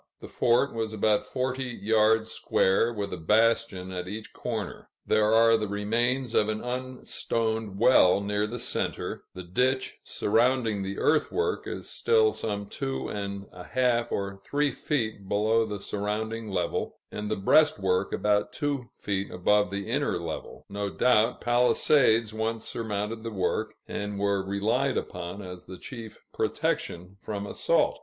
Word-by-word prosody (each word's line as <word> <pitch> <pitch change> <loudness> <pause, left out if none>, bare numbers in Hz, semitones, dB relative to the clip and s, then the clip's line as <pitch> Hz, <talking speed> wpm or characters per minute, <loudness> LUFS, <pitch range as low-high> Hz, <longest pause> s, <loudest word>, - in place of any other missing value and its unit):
The - - -9
fort 120 +4 +2
was 110 -1 -2
about 105 0 +2
forty 130 0 -2
yards 110 +1 +3
square, 95 +5 +2
with 100 -3 -4
a - - -3
bastion 105 0 +2
at 90 -1 -4
each 105 +3 -7
corner; 110 -6 -5 0.2
there 110 0 +3
are 115 0 +6
the 105 -1 -2
remains 115 +5 0
of 105 -2 +3
an 110 0 -1
unstoned 115 -4 -2
well 100 -5 +6
near 105 +1 0
the 120 +3 -5
center; 120 +2 -3
the 90 - -6
ditch 130 +9 0
surrounding 115 -1 +1
the 95 0 -4
earthwork 430 - +1
is - - -5
still 450 -2 +3
some 105 -2 -3
two 135 +6 -4
and 100 -1 -4
a 90 - -11
half 120 +2 +1
or 100 0 -3
three 145 +3 +1
feet 110 -8 -2
below 110 +2 +2
the 105 -1 -4
surrounding 110 +2 -3
level, 90 -3 -2 0.2
and 105 0 -4
the 110 - 0
breastwork 95 -5 +3
about 105 0 +1
two 140 -5 -2
feet 100 -1 -2
above 105 +3 +2
the 100 +1 -4
inner - - 0
level; - - -6
no 100 0 -3
doubt, 120 +1 +3
palisades 120 -2 +3
once 110 0 -2
surmounted 110 0 -3
the 115 - -4
work, 95 -4 -1
and 105 0 -4
were 100 -1 +1
relied 100 +3 0
upon 90 +4 -5
as 90 -1 -9
the 95 - -9
chief 115 -2 -9
protection 90 +3 -2
from 100 -1 -4
assault. - - +1
110 Hz, 150 wpm, -27 LUFS, 100-120 Hz, 0.2 s, are